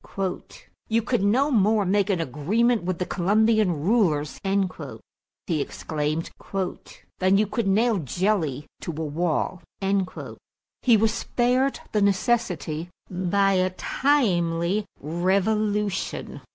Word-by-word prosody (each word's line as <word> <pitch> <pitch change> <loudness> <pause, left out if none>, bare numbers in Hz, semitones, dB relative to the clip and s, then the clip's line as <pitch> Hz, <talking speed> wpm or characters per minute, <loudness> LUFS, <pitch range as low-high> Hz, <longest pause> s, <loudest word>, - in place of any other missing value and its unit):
"You 230 0 +1
could 245 -1 0
no 250 +9 +2
more 215 -2 +3
make 200 +2 +2
an 190 -4 +1
agreement 200 - +1
with 180 0 -2
the 180 - -2
Colombian 205 -2 +2
rulers," 165 - +1 1.1
he 160 -6 0
exclaimed, 155 +2 -3 0.9
"than 190 +1 +4
you 215 - +3
could 215 +1 -2
nail 215 +2 +3
jelly 160 - -1
to - - -7
a - - -2
wall." 160 +3 -1 1.2
He 235 -3 +5
was 220 +1 +2
spared 255 +4 0
the 210 - +1
necessity 190 - 0 0.2
by 190 +2 +2
a 185 0 +2
timely 185 - +1
revolution. 200 +5 -1
195 Hz, 110 wpm, -25 LUFS, 170-220 Hz, 1.2 s, He